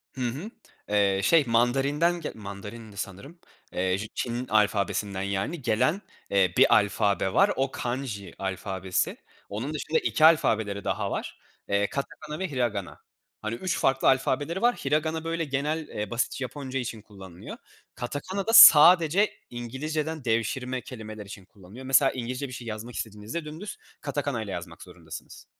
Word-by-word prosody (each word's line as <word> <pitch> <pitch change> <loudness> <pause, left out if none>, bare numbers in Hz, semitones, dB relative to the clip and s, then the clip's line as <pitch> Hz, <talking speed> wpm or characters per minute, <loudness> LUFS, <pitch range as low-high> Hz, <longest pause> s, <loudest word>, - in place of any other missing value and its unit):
Hı 130 - -6
hı, 135 - -3 0.4
eee, 100 -2 +2
şey, 165 - +5
Mandarin'den 140 +9 +2
ge 155 - -4
Mandarin'di 105 +1 -9
sanırım, 120 - -7 0.3
eee, 95 +1 0
j 105 +2 -5
Çin 120 +1 -3
alfabesinden, 100 -2 +1
yani, 100 - -2
gelen, 135 - +1 0.3
eee, 95 -3 +3
bir - - +6
alfabe 100 -2 +1
var, - - +5
o 135 0 0
kanji 120 -7 -4
alfabesi. 95 -1 -2 0.3
Onun 115 +9 -4
dışında 155 +1 0
2 155 - +2
alfabeleri 110 - +3
daha - - -2
var. - - -5 0.3
Eee, 100 0 +2
katakana 150 +2 -5
ve 190 -4 -3
hiragana. 115 -8 -2 0.4
Hani, 110 +1 -3
3 185 +9 -2
farklı 135 0 +2
alfabeleri 145 +6 +1
var. 240 +1 +4
Hiragana 155 +3 -1
böyle 165 0 -2
genel, 150 +3 -2
eee, 105 -1 -5
basitçe 120 +2 -1
Japonca 135 0 -5
için 115 -3 -5
kullanılıyor. 95 -4 -11 0.4
Katakana 165 - -4
da 225 - +1
sadece 175 0 +9 0.2
İngilizceden 150 +5 -4
devşirme 125 +3 -1
kelimeler 110 -3 -9
için 100 -1 -10
kullanılıyor. 100 +6 -13
Mesela 135 +1 +5
İngilizce 125 +2 -4
bir 130 - -10
şey 120 -1 -8
yazmak 110 +2 -6
istediğinizde 110 +9 -5
dümdüz 160 +7 -7 0.2
katakana'yla 140 -8 -3
yazmak 85 -1 -7
zorundasınız. 85 -3 -11
120 Hz, 145 wpm, -27 LUFS, 100-150 Hz, 0.4 s, sadece